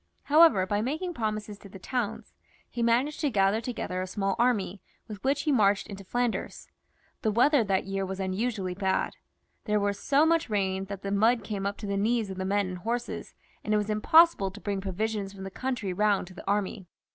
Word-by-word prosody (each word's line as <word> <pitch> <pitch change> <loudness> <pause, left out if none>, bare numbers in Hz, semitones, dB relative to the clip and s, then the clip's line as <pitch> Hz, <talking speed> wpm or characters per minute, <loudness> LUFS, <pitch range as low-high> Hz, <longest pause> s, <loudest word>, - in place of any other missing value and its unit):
However, 300 - +6
by 205 +2 0
making 315 +9 -2
promises 215 -5 -3
to 200 - -13
the 195 - -10
towns, 225 +1 -4 0.3
he 240 - -5
managed 240 +6 +2
to 295 - +1
gather 200 -1 +2
together 225 -6 -3
a 185 - -3
small 195 +1 -1
army, 210 -6 +1 0.3
with 210 -2 -9
which 275 +2 +1
he 305 - +1
marched 200 -5 +3
into 200 -2 -9
Flanders. 240 +4 -2 0.5
The 220 - +1
weather 245 +5 +4
that 195 -2 0
year 195 0 -2
was 190 0 -5
unusually 190 0 -2
bad. 190 0 -1 0.5
There 210 -1 +1
was 200 0 -1
such 285 +3 +3
hard 330 -5 +2
rain, 195 -2 0
that 195 0 -7
the 195 - -3
mud 225 +3 +3
came 200 -1 -3
up 200 - -4
to 210 - -7
the 200 0 -1
knees 220 0 +1
of 190 - -7
the 190 - -2
men 200 +1 +1
and 185 0 -5
horses, 235 +5 -4 0.3
and 215 - +1
it - - +4
was 210 0 -1
impossible 265 - +5
to 195 +3 -11
bring 200 -2 -3
provisions 200 +1 -3
from 195 -1 -9
the 195 - -6
country 240 -5 -3
round 205 0 +2
to - - -12
the 180 - -12
army. 200 -2 -1
205 Hz, 210 wpm, -28 LUFS, 195-235 Hz, 0.5 s, However